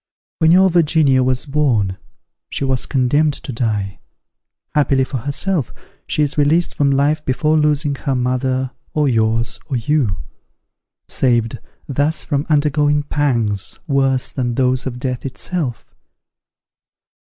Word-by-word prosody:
When 160 0 +4
your 190 +1 +5
Virginia 155 -5 +3
was 130 0 0
born, 130 -10 +1 0.5
she - - -3
was 130 -2 -1
condemned 145 +3 +2
to 135 - -6
die; 105 -4 -2 0.7
happily 140 -3 +2
for 130 0 -4
herself, 145 - -2 0.4
she 150 - +1
is 145 +1 -1
released 160 +4 +2
from 140 -1 +1
life 145 +3 +1
before 150 +4 +1
losing 150 -1 +2
her 135 0 -2
mother, 130 +1 -1 0.2
or 150 -1 +2
yours, 115 -1 +1
or 135 - -1
you; 120 - 0 0.9
saved, 120 -3 +1 0.3
thus 145 +3 -1
from 145 -1 -2
undergoing 150 0 +2
pangs 120 -10 -1
worse 135 -3 +1
than 120 -3 -2
those 130 0 +1
of 125 -2 -5
death 125 -1 -3
itself. 135 -1 -3
135 Hz, 130 wpm, -18 LUFS, 125-150 Hz, 0.9 s, your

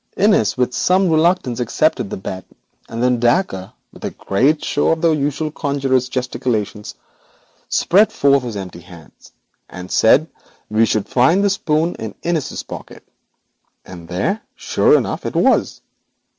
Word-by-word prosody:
Innis, 195 - +3
with 125 0 0
some 185 +3 +2
reluctance, 155 -7 +1
accepted 125 -1 0
the - - -5
bet, 95 -1 -6 0.5
and 115 +1 -3
then 125 -1 +2
Dacre, 120 - 0 0.2
with - - -15
a - - -2
great 135 +10 0
show 145 - 0
of 165 -1 +1
the 165 - +3
usual 150 +1 -1
conjurer's 135 -4 -1
gesticulations, 120 -5 -3 0.7
spread 210 +4 +3
forth 140 -9 +3
his 120 -3 -6
empty 95 -3 -7
hands, 85 -2 -16 0.4
and 90 0 -9
said 135 +8 +4 0.4
we 110 +1 +3
should 105 -2 -1
find 150 +11 +3
the 200 - +3
spoon 165 -3 0
in 110 -2 -6
Innis's 165 -4 -2
pocket, - - -10 0.8
and 85 -2 -11
there, 95 - -2
sure 450 0 +3
enough, - - -3
it - - -5
was. - - +2
130 Hz, 145 wpm, -18 LUFS, 110-160 Hz, 0.8 s, said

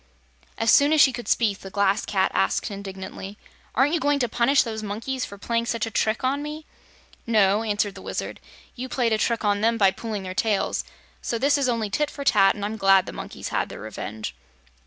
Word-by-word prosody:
As 225 - +3
soon 290 +1 +5
as 310 - +3
she 270 -3 +6
could 240 -1 -7
speak 210 -4 +1
the 195 - -9
Glass 200 +1 +1
Cat 190 -2 +1
asked 200 - 0
indignantly: 195 0 -7 0.4
"Aren't 270 +6 +3
you 340 - +2
going 290 -1 +2
to 250 -3 0
punish 240 +5 +3
those 220 -2 -5
monkeys 230 +5 -3
for 200 - -10
playing 230 +3 -1
such 230 -2 -1
a 225 - -6
trick 220 +4 0
on 270 +3 0
me?" 300 +1 -6 0.6
"No," 210 -2 +3
answered 205 -2 -1
the - - -11
Wizard. - - -5 0.4
"You 255 +1 -6
played 240 -3 +1
a 215 - +1
trick 230 -1 0
on 205 0 +2
them 230 +1 +2
by 195 -3 +5
pulling 215 -1 -5
their 185 0 -5
tails, 210 0 0 0.4
so 235 - -2
this 280 +5 +3
is 275 -3 +1
only 225 -4 -1
tit 295 +7 0
for 285 - -7
tat, 195 -7 +4
and 205 -1 -4
I'm 215 +2 -4
glad 195 -2 +5
the - - -7
monkeys - - -7
had - - -1
their - - -9
revenge." 110 - -6
220 Hz, 220 wpm, -24 LUFS, 200-250 Hz, 0.6 s, she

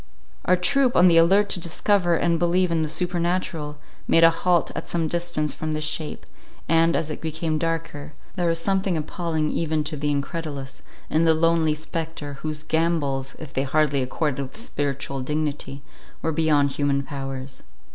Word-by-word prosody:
Our 180 - +5
troop, 255 +7 +2
on 180 - +7
the 170 -2 +5
alert 195 +5 +5
to - - +4
discover 175 +1 +1
and 170 0 +1
believe 175 +1 +2
in 165 -1 +1
the 155 - -1
supernatural, 170 -2 -2 0.3
made 165 - +5
a 165 - +8
halt 170 +1 +1
at - - -5
some 165 -2 0
distance 170 -2 -1
from 155 0 -3
this 155 0 -2
shape; 155 0 -3 0.4
and, 165 +1 +3
as 155 -1 -1
it - - -6
became 160 0 -2
darker, 165 -2 -3 0.2
there 175 -2 0
was 165 0 +2
something 190 0 0
appalling 160 0 -2
even 155 -2 0
to 155 +1 -4
the 150 0 -1
incredulous, 145 -1 -4 0.3
in 160 +2 +3
the 160 -1 +5
lonely 160 -1 +2
spectre, 155 -2 -5
whose 155 -1 -3
gambols, 155 -5 0
if 155 -3 -10
they 130 - 0
hardly 140 0 +1
accorded 140 +2 -1
with 135 +6 -7
spiritual 140 - -3
dignity, 145 0 -3 0.4
were 160 - +1
beyond 150 -3 +2
human 140 0 0
powers. 135 -2 -6
160 Hz, 170 wpm, -24 LUFS, 145-170 Hz, 0.4 s, a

